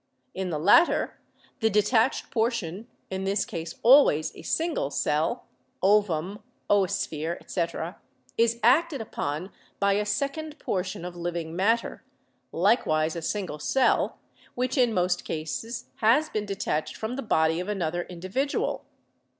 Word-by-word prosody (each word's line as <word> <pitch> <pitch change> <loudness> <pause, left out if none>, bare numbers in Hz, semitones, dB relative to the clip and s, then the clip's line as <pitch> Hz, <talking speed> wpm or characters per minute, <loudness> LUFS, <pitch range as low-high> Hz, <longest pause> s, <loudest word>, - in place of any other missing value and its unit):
In 190 -1 -3
the 160 - -2
latter, 205 - +4 0.4
the 220 - +3
detached 220 +4 +2
portion, 220 -4 -1 0.2
in 190 0 -3
this 195 +2 0
case 165 -3 -6
always 235 - +5
a - - -10
single 325 - -1
cell 150 +2 0 0.4
(ovum, 200 -1 +2 0.3
oosphere, 170 -4 0
etc.), 170 0 -3 0.4
is 230 0 +2
acted 285 +5 +4
upon 180 -4 -4 0.3
by 200 0 +3
a 210 +1 0
sec 275 +8 -1
ond 310 -1 -7
portion 185 -2 -3
of 180 -1 -6
living 170 -1 -4
matter, 225 +6 0 0.5
likewise 165 -5 +2
a 170 - -4
single 180 -3 -3
cell, 255 - +2 0.4
which 255 +1 -1
in 250 -4 +3
most 180 -2 0
cases 230 +10 -5
has 250 +8 +3
been 210 -5 -3
detached 190 -6 -2
from 220 +3 -4
the 275 - -3
body 160 -7 +2
of 180 - -4
another 175 -4 -1
n8 - - -21
BIOLOGY - - -12
individual. 190 +11 -2
200 Hz, 140 wpm, -27 LUFS, 170-235 Hz, 0.5 s, always